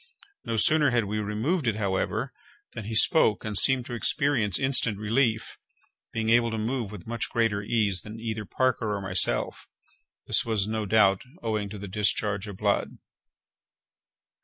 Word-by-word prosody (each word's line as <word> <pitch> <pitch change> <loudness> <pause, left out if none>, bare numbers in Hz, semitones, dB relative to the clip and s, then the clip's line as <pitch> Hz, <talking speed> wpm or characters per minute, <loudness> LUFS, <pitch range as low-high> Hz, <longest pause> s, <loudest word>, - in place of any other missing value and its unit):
No 115 -1 -3
sooner 150 +5 +4
had 120 -3 +1
we 105 +2 -3
removed 115 - -1
it, 110 - +1
however, 100 -3 -2 0.4
than 110 - -7
he 110 +1 -4
spoke, 110 - +3
and 105 -1 -4
seemed 130 +4 +3
to 120 - -7
experience 120 - +1
instant 130 -5 +1
relief—being 110 0 -3
able 115 0 +4
to 110 - -3
move 115 -1 -2
with 100 -5 -10
much 115 -1 -3
greater 115 -3 0
ease 100 -4 0
than 110 +1 -9
either 110 -1 -4
Parker 115 -2 0
or - - -3
myself—this 95 -1 -2
was 110 -4 0
no 110 -1 -3
doubt 100 -2 +4 0.2
owing 110 -3 -2
to 105 - -8
the 100 +1 -7
discharge 105 +1 0
of 100 -2 -8
blood. 100 0 -1
110 Hz, 155 wpm, -26 LUFS, 105-115 Hz, 0.4 s, sooner